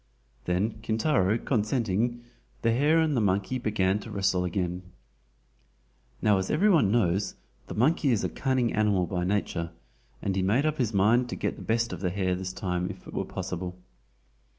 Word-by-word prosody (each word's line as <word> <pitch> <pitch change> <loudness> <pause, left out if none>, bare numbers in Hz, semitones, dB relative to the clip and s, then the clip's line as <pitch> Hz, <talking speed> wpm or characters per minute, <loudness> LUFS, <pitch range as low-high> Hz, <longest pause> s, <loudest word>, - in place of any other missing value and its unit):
Then 100 +5 0
Kintaro 110 -2 +1
consenting, 115 0 0 0.4
the 115 - +3
hare 145 +7 +3
and 160 -3 +2
the 120 - +2
monkey 100 +5 0
began 105 -3 +1
to 115 - -9
wrestle 95 -3 +1
again. 90 0 -2 1.4
Now, 105 -2 +4
as 95 - -3
every 200 +7 +3
one 145 - +4
knows, 100 -3 +1 0.3
the - - -6
monkey 145 +5 +2
is 115 -5 +2
a - - 0
cunning 130 -3 0
animal 105 -4 +2
by 90 0 -2
nature, 90 -4 -1 0.5
and 95 - -2
he 95 - +1
made 110 +10 +2
up 155 -1 0
his 120 -4 +1
mind 115 +5 +3
to - - -3
get - - -2
the - - -11
best 115 -2 0
of 90 - -5
the 90 - 0
hare 95 0 0
this 95 0 -3
time 90 -1 -2
if - - -9
it - - -10
were - - -2
possible. 90 0 -5
105 Hz, 180 wpm, -27 LUFS, 95-120 Hz, 1.4 s, Now